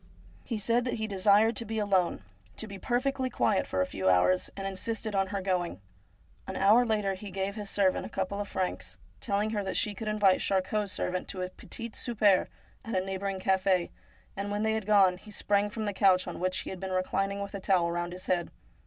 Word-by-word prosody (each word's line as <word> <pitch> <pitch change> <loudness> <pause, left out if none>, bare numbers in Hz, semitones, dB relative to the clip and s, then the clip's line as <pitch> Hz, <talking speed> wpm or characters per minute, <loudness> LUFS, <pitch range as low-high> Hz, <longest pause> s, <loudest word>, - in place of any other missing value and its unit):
He 230 - -3
said 230 +4 +1
that 245 - -1
he 220 - -2
desired 205 +2 +4
to - - +1
be 225 0 -4
alone, 190 - +1 0.3
to - - -1
be 200 -2 -9
perfectly 260 +4 0
quiet 210 -5 +1
for 95 - 0
a - - +3
few 95 0 -1
hours, 95 - +3
and 195 - -4
insisted 215 +3 -3
on 195 -1 +1
her 200 0 -3
going. 180 - -1 0.7
An - - -5
hour 210 +5 +5
later 210 -3 +1
he 200 +2 -8
gave 195 +1 -2
his 210 -1 -6
servant 195 -2 +2
a - - -7
couple 195 +1 -3
of 205 - -4
francs, 185 -2 -3 0.2
telling 210 -2 0
her 210 -2 -1
that 190 - -2
she 210 - +1
could 215 +2 -6
invite 205 -3 +3
Charcot's 195 +1 0
servant 185 0 -2
to 185 -1 -4
a 180 - -5
petit 230 +4 -6
souper 210 -6 +2 0.4
at 225 - -4
a 185 0 +1
neighbouring 195 0 -3
cafe, 190 -1 +2 0.4
and 200 +1 -3
when 205 +1 -1
they 220 0 +2
had 220 -2 -3
gone 195 -4 +5
he 215 - -14
sprang 205 0 +1
from 215 +1 -4
the 205 - -1
couch 190 -2 +4
on 175 - -5
which 185 +1 0
he - - -6
had 190 - -7
been 190 0 -4
reclining 195 +2 0
with 200 0 -5
a 200 - -4
towel 180 -3 +2
round 175 0 -2
his 185 +1 -7
head. 175 -2 0
195 Hz, 225 wpm, -29 LUFS, 185-215 Hz, 0.7 s, hour